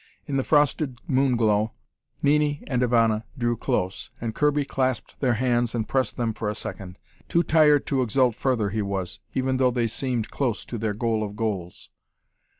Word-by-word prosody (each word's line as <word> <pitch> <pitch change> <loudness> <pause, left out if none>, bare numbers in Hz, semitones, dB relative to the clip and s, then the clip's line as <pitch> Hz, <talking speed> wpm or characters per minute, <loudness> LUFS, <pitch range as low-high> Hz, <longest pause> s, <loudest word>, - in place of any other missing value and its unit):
In 140 - -3
the 135 - +1
frosted 145 -3 +2
moon 135 -5 +2
glow, 110 -1 +2 0.5
Nini 145 0 +2
and 125 -3 -1
Ivana 115 -3 +3
drew 120 -1 +1
close, 95 -3 -2
and 115 -1 -3
Kirby 145 +1 +2
clasped 130 -3 -2
their 125 -4 +2
hands 120 -1 +1
and 110 -2 -1
pressed 130 -5 0
them 115 -2 0
for 105 0 -3
a 105 - -3
second. 95 -2 -7 0.3
Too 170 - +3
tired 150 -3 +4
to 135 -2 +1
exult 125 +1 +2
further 115 -4 0
he 110 +1 -1
was, 100 -1 -3 0.2
even 130 0 +1
though 130 -1 +4
they 120 -1 0
seemed 115 0 -2
close 125 -6 -1
to 120 - -5
their 110 -1 -1
goal 115 0 0
of 105 -1 -5
goals. 100 -6 -4
120 Hz, 180 wpm, -25 LUFS, 110-135 Hz, 0.5 s, tired